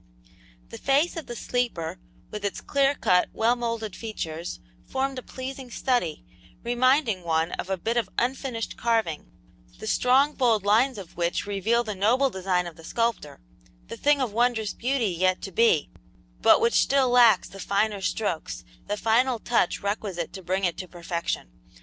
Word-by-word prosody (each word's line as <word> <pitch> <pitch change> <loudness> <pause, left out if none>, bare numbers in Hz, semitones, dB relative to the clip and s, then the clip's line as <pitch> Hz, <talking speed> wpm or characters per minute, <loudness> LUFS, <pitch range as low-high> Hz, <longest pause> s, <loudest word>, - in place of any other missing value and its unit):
The - - -9
face 285 +5 +2
of 330 - -6
the 240 - -6
sleeper, 235 - -2 0.3
with 210 -1 -6
its 200 - -2
clear 280 0 +1
cut, 180 -8 +2
well 230 +2 +2
moulded 230 -4 -3
features, 170 -7 -5 0.3
formed 265 0 -2
a - - -9
pleasing 260 0 -7
study, 235 - -1 0.4
reminding 245 -3 +2
one 165 0 0
of 185 - -5
a 190 - 0
bit 230 +6 -2
of 225 -5 0
unfinished 250 -2 -2
carving, 225 -10 -1 0.5
the - - -8
strong, 270 +4 +3
bold 230 -7 +2
lines 230 +5 +3
of 185 -5 -10
which 170 0 -1
reveal 205 +4 +1
the 215 -2 -4
noble 240 +8 +2
design 185 -2 0
of 170 -1 -8
the 165 - -13
sculptor 230 - -2 0.5
the - - -5
thing 290 0 +3
of 250 -6 -1
wondrous 230 -2 +1
beauty 255 0 0
yet 185 -1 +1
to 195 - -5
be 170 - +3 0.5
but - - +6
which 235 - +3
still 270 -2 +3
lacks 235 -6 +6
the 195 - -12
finer 200 +1 0
strokes, 185 -4 -2 0.2
the 205 - -2
final 235 +4 +2
touch 230 -4 0
requisite 200 -4 -3
to 190 - -7
bring 190 +2 -1
it 175 - -1
to 185 - -5
perfection. 170 - -4
220 Hz, 170 wpm, -26 LUFS, 185-245 Hz, 0.5 s, but